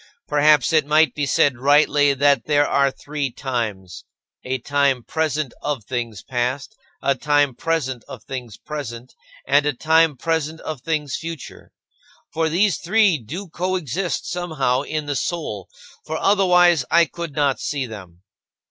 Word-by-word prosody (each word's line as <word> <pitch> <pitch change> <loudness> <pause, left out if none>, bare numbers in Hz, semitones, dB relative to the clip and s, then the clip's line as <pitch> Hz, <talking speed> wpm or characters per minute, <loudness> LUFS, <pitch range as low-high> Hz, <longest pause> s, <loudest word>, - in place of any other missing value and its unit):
Perhaps 150 0 +4
it 155 -2 +3
might 155 +1 +4
be 145 -1 -2
said 135 -2 +2
rightly 145 +1 +4
that 140 -2 +3
there 145 -1 +3
are 140 0 +3
three 145 +1 -4
times: 110 -9 -4 0.4
a 130 +1 -2
time 140 -1 +1
present 155 -3 -2
of 145 -6 -3
things 115 -3 -4
past; 130 - -3 0.3
a 140 - +3
time 145 0 +1
present 130 -4 -2
of - - -10
things 125 -5 -7
present; 130 -5 -7 0.3
and 145 +1 +3
a 150 - +1
time 160 +2 +3
present 160 +1 -2
of 155 -5 -6
things 150 -1 -2
future. 165 -4 -8 0.6
For 160 0 +1
these 185 +4 +2
three 190 -2 +3
do 170 - -7
coexist 180 -1 -2
somehow 160 -8 -1
in 155 +1 -4
the 145 -1 -2
soul, 170 +5 -3 0.3
for - - -4
otherwise 180 -6 +4
I 170 0 +5
could 170 -3 -7
not 145 -3 +1
see 140 -3 -2
them. 95 -6 -11
145 Hz, 150 wpm, -21 LUFS, 130-160 Hz, 0.6 s, I